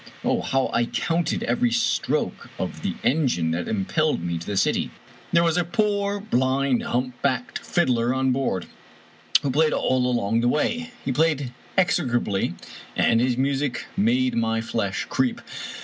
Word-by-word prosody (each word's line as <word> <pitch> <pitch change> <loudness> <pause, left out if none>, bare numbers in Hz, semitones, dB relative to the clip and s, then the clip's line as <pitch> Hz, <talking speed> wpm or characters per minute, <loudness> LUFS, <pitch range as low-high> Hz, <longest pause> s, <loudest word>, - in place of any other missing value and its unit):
Oh, - - +1
how 135 0 0
I 120 - +2
counted 170 - -1
every 240 0 +1
stroke 235 0 0
of - - -4
the - - -2
engine 125 - +2
that 85 +1 -2
impelled 110 - 0
me 85 -1 -2
to 85 - -9
the 100 - -2
city! - - +1 0.4
There 170 0 +4
was 165 0 +2
a 175 - +3
poor, 200 +2 0
blind, 130 - +1
humpbacked 125 0 -1
fiddler 125 -8 +1
on 130 0 +1
board, 125 -9 -1 0.8
who 140 - 0
played 155 +3 +3
all 130 -1 +1
along 115 -2 +1
the 120 - +2
way. 235 - 0 0.2
He 135 - 0
played 145 -3 +1 0.2
execrably, 125 - +1 0.4
and 115 0 +3
his 125 -1 +1
music 135 -1 0
made 125 +4 +2
my 115 -1 +1
flesh 110 -4 -2
creep. 130 -1 0
130 Hz, 150 wpm, -24 LUFS, 115-160 Hz, 0.8 s, There